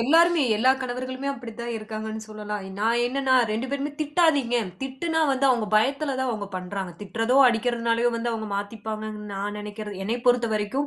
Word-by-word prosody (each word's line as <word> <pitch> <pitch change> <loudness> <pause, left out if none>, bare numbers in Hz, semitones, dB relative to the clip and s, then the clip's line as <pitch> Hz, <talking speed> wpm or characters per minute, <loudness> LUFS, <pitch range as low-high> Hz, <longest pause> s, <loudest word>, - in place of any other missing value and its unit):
எல்லாருமே 330 +5 +5
எல்லா 255 +5 +5
கணவர்களுமே 255 +2 -4
அப்டி 245 -4 -7
தான் 235 0 -3
இருக்காங்கன்னு 220 0 -5
சொல்லலாம். 210 -1 -5 0.2
நான் 230 +2 +2
என்னன்னா, 265 +1 0 0.2
2 225 +4 -1
பேருமே 280 +1 -2
திட்டாதீங்க. 295 -5 +3 0.3
திட்டுனா, 320 +5 -1
வந்து 270 +1 +2
அவங்க 240 -4 +2
பயத்துல 275 +5 +1
தான் 260 -1 0
அவங்க 210 -3 -3
பண்றாங்க. 185 0 -4
திட்டுறதோ, 225 +5 0
அடிக்கிறதுனாலே 235 0 +1
வந்து 235 +1 -1
அவங்க 220 -1 -3
மாத்திப்பாங்கன்னு 215 +1 -5
நான் 205 +1 -3
நெனைக்கறது 210 -1 -6
என்னை 225 +4 0
பொறுத்தவரைக்கும் 235 +2 +2
235 Hz, 155 wpm, -25 LUFS, 215-265 Hz, 0.3 s, எல்லாருமே